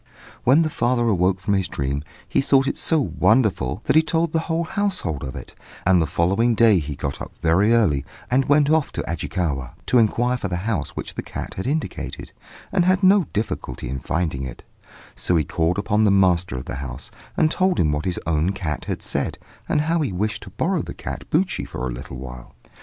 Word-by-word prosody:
"When 140 +7 +6
the 155 - -1
father 120 -2 +1
awoke 95 -2 +2
from 100 +3 -1
his 95 -2 +1
dream, 70 -1 -2 0.2
he - - +2
thought 135 -1 +4
it - - -1
so 160 - +2
wonderful, 110 - +2
that - - +1
he 160 - +8
told 165 +1 0
the 165 +1 -1 0.2
household 185 - -1
of 65 -1 -5
it; - - -9 0.3
and 90 -1 +5
the 80 - +1
following 100 +10 +2
day 110 -4 +5
he 75 -2 -5
got 70 0 -4
up - - -7
very 90 +7 +4
early 95 -13 +3 0.3
and 130 +2 +3
went 145 0 +4
off 160 -3 +2
to - - -2
Ajikawa, 80 -6 -2
to 125 - +4
inquire 120 +3 +2
for 105 - -3
the 90 - -2
house 105 -10 -2
which - - -5
the - - -4
cat - - -6
had 95 - -4
indicated, 155 +3 -3 0.4
and 190 -2 +3
had 185 +2 +2
no 190 -1 +6
difficulty 65 - -4
in 65 +1 -3
finding 80 -3 -2
it; 65 - -7 0.5
so 90 - 0
he 80 - +3
called 80 +5 0
upon 105 +1 +1
the 105 - +5
master 90 -6 +3
of 65 - -5
the 65 - -5
house, 65 0 -6 0.3
and 155 - +3
told 185 0 +2
him 75 - +3
what 75 +1 -2
his 90 -2 -1
own 85 +3 +1
cat 85 -6 -4
had - - -4
said, - - -2 0.3
and - - +2
how 165 +2 +1
he 140 - -1
wished 105 +4 -2
to 100 - -10
borrow 165 - 0
the - - -7
cat - - -7
Buchi 180 +4 +1
for 65 - -4
a - - -3
little 65 +1 -8
while. 60 -1 -10
100 Hz, 215 wpm, -22 LUFS, -, 0.5 s, he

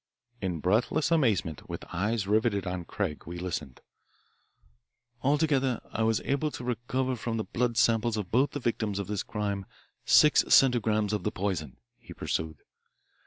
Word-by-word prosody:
In 90 -5 -2
breathless 115 - +1
amazement, 110 - +1
with - - -6
eyes 105 +3 0
riveted 105 -1 +1
on 90 -2 -4
Craig, 85 -6 -4
we 85 +1 -6
listened. 85 -7 -5 1.4
"Altogether 140 -3 +2
I 110 - -3
was 110 -1 +2
able 140 +2 0
to 125 - -8
recover 125 +2 -1
from 115 -1 -3
the 110 - -1
blood 120 0 -1
samples 115 -3 +3
of 100 -4 -4
both 130 +5 +3
of - - -26
the - - 0
victims 105 -3 -3
of 100 - -2
this 105 -1 -2
crime 100 -3 -3 0.4
six 150 0 +6
centigrams 110 -5 +4
of 105 - 0
the - - -1
poison," 90 -8 -3 0.2
he - - -12
pursued. 80 -3 -3
110 Hz, 160 wpm, -28 LUFS, 95-125 Hz, 1.4 s, six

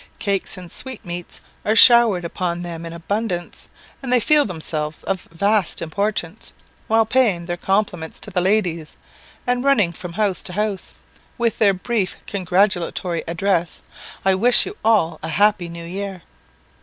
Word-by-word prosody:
Cakes 200 -2 -2
and 180 -2 -10
sweetmeats 180 -9 -7 0.2
are 215 - +1
showered 230 -7 +6
upon 175 0 -3
them 170 -1 -6
in - - -7
abundance, 180 +1 -4 0.3
and 260 -2 -4
they 250 - +5
feel 295 +5 +3
themselves 155 -4 -4
of 195 -2 -3
vast 200 +2 +1
importance, 200 +2 -3 0.3
while 225 0 +3
paying 215 -8 +2
their 175 0 -3
compliments 180 -3 -1
to - - -4
the 180 -1 0
ladies, 175 -5 0 0.5
and 245 0 0
running 260 -11 +3
from 175 +1 -8
house 200 -2 0
to 180 - -3
house, 210 -1 -2 0.4
with 235 -3 0
their 200 -3 +4
brief 200 -1 -2
congratulatory 180 -2 0
address 175 0 -1 0.4
"I 190 - +4
wish 235 +6 +6
you 405 - -7
all 215 -7 +2
a 160 - -5
happy 205 0 +2
New 170 0 -8
Year!" 190 0 -6
190 Hz, 150 wpm, -21 LUFS, 170-215 Hz, 0.5 s, showered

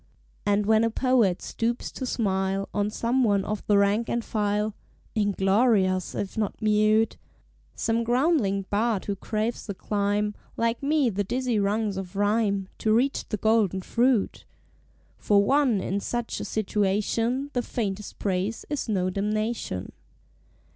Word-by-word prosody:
And 205 0 +2
when 220 +1 +4
a 230 - +2
Poet 230 -6 +2
stoops 235 +1 -2
to 260 - -5
smile 195 -3 0
On 205 0 0
some 240 +4 0
one 200 -4 +2
of 210 -1 -3
the 205 - +4
rank 200 +3 +2
and 235 -1 -1
file, 210 0 0 0.4
(Inglorious 195 -1 +2
if 200 - -4
not 210 - -2
mute,) 215 +1 +3 0.6
Some 230 0 0
groundling 240 - +1
bard 215 -1 +1
who 200 - -2
craves 215 +4 -3
to 200 - -4
climb, 205 +1 -1 0.2
Like 230 0 0
me, 285 -3 +2
the 205 +1 -1
dizzy 245 +1 -1
rungs 205 0 0
of 190 0 -6
Rhyme, 205 -1 +1
To 220 - +1
reach 250 +5 +1
the 215 - -1
Golden 205 -3 +2
Fruit; 240 -1 +1 0.8
For 200 -1 +3
one 265 -2 +3
in 195 +1 -2
such 240 +3 -3
a - - -4
situation 220 +6 0
The 245 - +1
faintest 210 -4 -4
praise 195 +3 -2
is 285 -5 -2
no 185 -3 0
damnation. 210 - -2
215 Hz, 145 wpm, -26 LUFS, 200-230 Hz, 0.8 s, when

